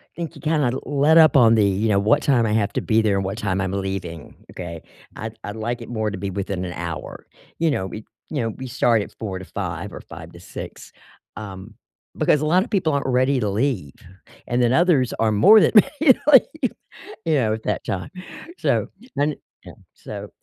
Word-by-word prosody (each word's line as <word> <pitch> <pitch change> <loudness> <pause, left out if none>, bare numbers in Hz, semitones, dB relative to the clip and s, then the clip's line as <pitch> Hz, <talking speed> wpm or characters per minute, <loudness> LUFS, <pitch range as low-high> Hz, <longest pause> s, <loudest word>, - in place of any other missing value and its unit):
think 170 -3 -6
you - - -12
kinda 150 -5 +1
let 145 +3 +3
up 155 -4 +6
on 115 -4 +6
the, 105 -2 +4
you 100 +3 0
know, 100 -2 +3
"what 110 +9 +3
time 125 -5 +3
I 105 - 0
have 105 -2 +1
to - - -1
be 110 0 +2
there 105 -2 +1
and 95 -1 -1
what 95 +2 -4
time 95 -4 -1
I'm 95 -1 -1
leaving," 95 -5 -5 0.2
okay? 85 -3 -7 0.3
I'd 110 0 -7
I'd 105 - -6
like 120 +2 -3
it 115 - -9
more 110 -3 -2
to 105 - -5
be 100 +1 -4
within 95 -1 -4
an 90 - -5
hour, 85 -2 -6 0.3
you 165 -1 +2
know, 95 -9 -2
we 105 +2 -8 0.2
you 145 -4 -2
know, 115 - -1
we 130 +4 -7
start 120 -3 +2
at - - -9
4 95 -4 -4
to 95 - -9
5 - - -5
or - - -8
5 80 +2 -11
to 85 - -12
6, 90 - -9 0.5
um, 100 0 -9 0.4
because 150 - +2
a - - 0
lot 180 +5 +3
of - - -11
people 185 -7 +1
aren't 140 0 -1
ready 130 +1 +2
to 105 -4 -1
leave, 100 - -1 0.5
and 120 +1 0
then 120 0 +3
others 160 -6 +3
are 110 -1 +2
more 155 - +7
than - - +3
ready 275 +5 +6
to - - -19
leave, 315 +4 +4 0.5
you 160 -2 +2
know, 115 -6 +1
at 110 0 -6
that 105 - -2
time, 90 -2 -4 0.5
so - - +1 0.3
and 145 +1 +1 0.3
Yeah, - - -11 0.2
so - - -8
110 Hz, 220 wpm, -22 LUFS, 100-140 Hz, 0.5 s, more